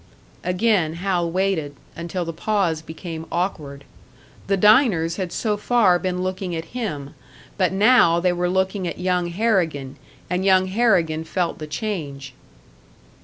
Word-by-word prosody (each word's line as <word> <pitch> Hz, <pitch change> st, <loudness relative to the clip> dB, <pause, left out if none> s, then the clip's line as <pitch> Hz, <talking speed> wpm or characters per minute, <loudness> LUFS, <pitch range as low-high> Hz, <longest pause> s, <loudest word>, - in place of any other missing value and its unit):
Again 180 Hz, -3 st, +1 dB
Hal 175 Hz, -1 st, -1 dB
waited 170 Hz, -5 st, -1 dB, 0.2 s
until 170 Hz, +1 st, -4 dB
the 165 Hz, -, -5 dB
pause 175 Hz, -3 st, 0 dB
became 160 Hz, 0 st, -8 dB
awkward. 150 Hz, -6 st, -3 dB, 0.6 s
The 195 Hz, 0 st, +2 dB
diners 200 Hz, -, +4 dB
had 185 Hz, -3 st, -3 dB
so 210 Hz, -2 st, -1 dB
far 205 Hz, -5 st, +3 dB
been 180 Hz, -1 st, -2 dB
looking 185 Hz, -1 st, -3 dB
at 165 Hz, 0 st, -4 dB
him; 150 Hz, -, -4 dB, 0.4 s
but 185 Hz, -3 st, +1 dB
now 195 Hz, -4 st, +5 dB
they 180 Hz, 0 st, +2 dB
were 175 Hz, 0 st, -1 dB
looking 190 Hz, 0 st, 0 dB
at -, -, -5 dB
young 180 Hz, -1 st, 0 dB
Harrigan, 170 Hz, -, -1 dB, 0.3 s
and 180 Hz, +1 st, -1 dB
young 190 Hz, -1 st, +4 dB
Harrigan 185 Hz, -6 st, +1 dB
felt 175 Hz, +1 st, -2 dB
the 155 Hz, -, -6 dB
change. 150 Hz, -, -5 dB
180 Hz, 140 wpm, -22 LUFS, 165-195 Hz, 0.6 s, now